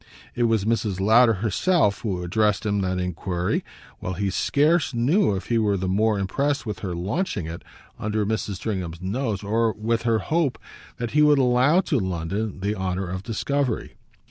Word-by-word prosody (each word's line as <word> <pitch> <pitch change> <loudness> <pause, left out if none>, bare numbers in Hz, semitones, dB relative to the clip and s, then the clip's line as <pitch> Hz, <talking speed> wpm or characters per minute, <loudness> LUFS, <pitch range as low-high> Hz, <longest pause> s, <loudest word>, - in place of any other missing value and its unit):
It 120 - +1
was 110 -3 +1
Mrs. 110 -4 0
Lowder 115 +4 +5
herself 110 - +2
who 95 -5 -2
addressed 105 +3 +1
him 100 -1 +1
that 95 -1 -1
enquiry; 90 0 -2 0.4
while 90 - -4
he 100 +1 -1
scarce 145 - +2
knew 125 - +2
if 95 - -5
he 115 -1 +2
were 105 -2 +1
the 95 0 -2
more 105 +3 +2
impressed 140 +9 -1
with 105 -3 -4
her 90 -4 -4
launching 95 - -2
it 80 +1 -7 0.4
under 105 0 -1
Mrs. 105 -1 -2
Stringham's 90 -5 -4
nose 105 +1 -2
or 110 +2 +1
with 115 +2 -1
her 115 -1 +2
hope 155 - 0 0.4
that 120 -1 -4
he 150 - +3
would 150 -1 +6
allow 130 +6 +4
to 145 -8 0
London 95 +2 -3
the 100 +2 0
honour 95 -1 -2
of 95 +1 -4
discovery. 125 +4 -2
105 Hz, 175 wpm, -24 LUFS, 95-120 Hz, 0.4 s, would